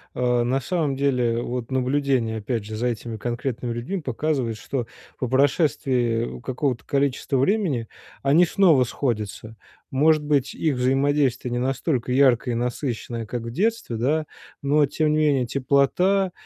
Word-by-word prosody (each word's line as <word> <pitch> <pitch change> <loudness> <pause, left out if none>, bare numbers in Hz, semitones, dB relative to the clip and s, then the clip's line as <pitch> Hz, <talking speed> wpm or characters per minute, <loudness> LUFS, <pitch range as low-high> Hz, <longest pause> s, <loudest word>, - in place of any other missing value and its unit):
э, 125 -1 +1
на 130 +3 +1
самом 150 -1 -1
деле, 125 -4 +1
вот 120 -1 -4
наблюдение, 130 -3 0
опять 110 0 -3
же, 110 - -6
за 120 +3 -1
этими 115 -1 -4
конкретными 120 +1 -3
людьми 125 +11 -3
показывает, 130 -3 -1
что 120 +1 -4 0.3
по 125 - -1
прошествии 130 -4 +1
какого-то 130 -2 -2
количества 140 -1 0
времени 140 - +1 0.4
они 150 +6 +5
снова 165 -7 +4
сходятся. 110 -3 -3 0.4
Может 155 +3 +3
быть, 145 -2 0
их 155 -4 0
взаимодействие 130 0 +1
не 120 - -1
настолько 130 0 -1
яркое 125 -2 +3
и - - -1
насыщенное, 120 -1 -3
как 120 +1 -4
в 115 - -6
детстве, 210 - -1
да. 150 +7 +1 0.4
Но, 145 +1 +3
тем 155 +2 0
не 155 - +2
менее, 140 -4 +2
теплота, 145 +9 +2
130 Hz, 145 wpm, -23 LUFS, 120-145 Hz, 0.4 s, они